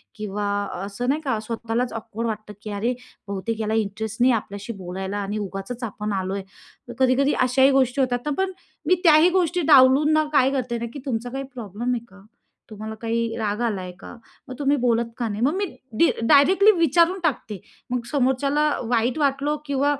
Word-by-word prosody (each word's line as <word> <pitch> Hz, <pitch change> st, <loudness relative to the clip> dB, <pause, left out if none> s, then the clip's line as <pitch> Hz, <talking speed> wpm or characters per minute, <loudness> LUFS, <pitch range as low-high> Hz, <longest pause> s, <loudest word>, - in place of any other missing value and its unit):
किंवा 210 Hz, -1 st, -4 dB, 0.4 s
असं 245 Hz, +6 st, -3 dB
नाही 300 Hz, +3 st, +1 dB
का 260 Hz, -7 st, -1 dB
स्वतःलाच 230 Hz, +1 st, -2 dB
ऑकवर्ड 230 Hz, +1 st, -5 dB
वाटतं 215 Hz, -1 st, -5 dB
की 215 Hz, -, -6 dB
"अरे 225 Hz, +5 st, -1 dB, 0.3 s
बहुतेक 200 Hz, +3 st, -3 dB
ह्याला 220 Hz, 0 st, -2 dB
इंटरेस्ट 220 Hz, +3 st, -5 dB
नाही 255 Hz, 0 st, +5 dB
आपल्याशी 205 Hz, 0 st, -4 dB
बोलायला 190 Hz, +3 st, -4 dB
आणि 205 Hz, +1 st, -3 dB
उगाचच 195 Hz, +7 st, -7 dB
आपण 210 Hz, -2 st, -4 dB
आलोय." 190 Hz, +1 st, -3 dB, 0.5 s
तर 240 Hz, -, -5 dB
कधी-कधी 265 Hz, +2 st, +3 dB, 0.2 s
अशाही 265 Hz, +2 st, +5 dB
गोष्टी 260 Hz, +2 st, 0 dB
होतात 245 Hz, -1 st, +1 dB
ना 300 Hz, -, -1 dB
पण 380 Hz, -, -2 dB, 0.4 s
मी 365 Hz, -, +5 dB
त्याही 320 Hz, +1 st, +7 dB
गोष्टी 350 Hz, 0 st, 0 dB
डावलून 270 Hz, +3 st, +6 dB
ना 310 Hz, 0 st, +3 dB
काय 270 Hz, -2 st, +4 dB
करते 250 Hz, -3 st, -2 dB
ना 235 Hz, -, -3 dB
की 285 Hz, -, -6 dB
"तुमचा 245 Hz, -2 st, -2 dB
काही 270 Hz, +2 st, -4 dB
प्रॉब्लेम 235 Hz, +1 st, -4 dB
आहे 235 Hz, -1 st, -4 dB
का? 200 Hz, +1 st, -17 dB, 0.5 s
तुम्हाला 220 Hz, 0 st, -7 dB
काही 230 Hz, 0 st, -2 dB
राग 210 Hz, 0 st, -2 dB
आला 215 Hz, -6 st, -1 dB
आहे 180 Hz, -, -7 dB
का? -, -, -10 dB, 0.3 s
मग 255 Hz, -, -7 dB
तुम्ही 285 Hz, 0 st, +2 dB
बोलत 235 Hz, -1 st, +2 dB
का 235 Hz, -2 st, -1 dB
नाही?" 205 Hz, +1 st, -4 dB
मग 285 Hz, -, +3 dB
मी 400 Hz, +1 st, 0 dB, 0.3 s
डी 335 Hz, -, +6 dB, 0.2 s
डायरेक्टली 375 Hz, +9 st, +6 dB
विचारून 335 Hz, +4 st, +3 dB
टाकते. 225 Hz, -, -2 dB, 0.3 s
मग 245 Hz, -2 st, -2 dB
समोरच्याला 275 Hz, +1 st, +1 dB, 0.3 s
वाईट 240 Hz, +2 st, +1 dB
वाटलं 285 Hz, +1 st, +1 dB
किंवा 285 Hz, +1 st, +1 dB
240 Hz, 185 wpm, -23 LUFS, 215-280 Hz, 0.5 s, त्याही